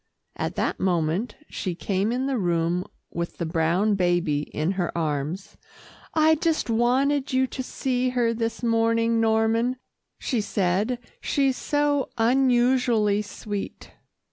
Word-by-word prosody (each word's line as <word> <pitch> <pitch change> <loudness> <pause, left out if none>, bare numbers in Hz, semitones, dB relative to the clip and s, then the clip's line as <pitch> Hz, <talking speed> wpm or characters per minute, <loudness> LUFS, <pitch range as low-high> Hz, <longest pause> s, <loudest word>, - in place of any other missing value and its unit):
At - - -3
that - - -1
moment, 180 +4 0
she 185 -3 -4
came 195 +4 -1
in 255 +2 -1
the 270 -3 0
room 175 -1 0 0.3
with 170 0 -4
the 170 - -2
brown 170 +6 +1
baby 175 -6 +1
in 155 +4 -1
her 185 -3 -1
arms. 155 +3 -3 0.6
"I 315 0 +5
just 315 -5 0
wanted 265 +5 +2
you 260 0 +3
to 260 - -5
see 255 0 -1
her 240 -2 +1
this 230 +1 -3
morning, 230 0 +2
Norman," 225 +3 +2 0.4
she 245 -6 -1
said, 205 +4 0 0.2
"she's 275 -2 +1
so 290 -1 0
unusually 240 -3 +3
sweet." 205 -1 -6
225 Hz, 130 wpm, -25 LUFS, 180-255 Hz, 0.6 s, I